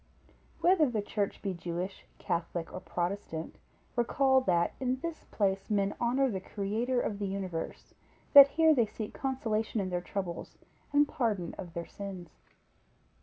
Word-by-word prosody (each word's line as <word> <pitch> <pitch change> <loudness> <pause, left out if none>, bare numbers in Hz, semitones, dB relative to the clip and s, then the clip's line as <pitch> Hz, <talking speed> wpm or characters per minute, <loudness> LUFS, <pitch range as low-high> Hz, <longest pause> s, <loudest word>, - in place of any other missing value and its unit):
Whether 345 -5 +5
the 215 -4 -1
church 205 -1 -2
be 195 -2 -1
Jewish, 175 +2 -5
Catholic, 170 -1 -3
or - - -4
Protestant, 175 -3 -4 0.4
recollect, 265 +2 +3
that 170 -1 +2
in 255 0 0
this 335 -1 -5
place 195 -2 -1
men 200 -2 +1
honor 255 +3 +3
the 190 - -2
Creator 220 +6 -1
of 205 -4 -2
the 200 - -1
Universe; 190 -4 -5 0.4
that 280 -1 +12
here 320 +2 +4
they 240 -6 +3
seek 215 0 -6
consolation 225 -5 -1
in 185 -2 -2
their 175 0 -1
troubles, 180 -2 -5 0.3
and 290 0 +5
pardon 210 -11 -1
of 175 -3 -8
their 170 0 -3
sins. 190 -5 -8
205 Hz, 150 wpm, -31 LUFS, 185-255 Hz, 0.4 s, that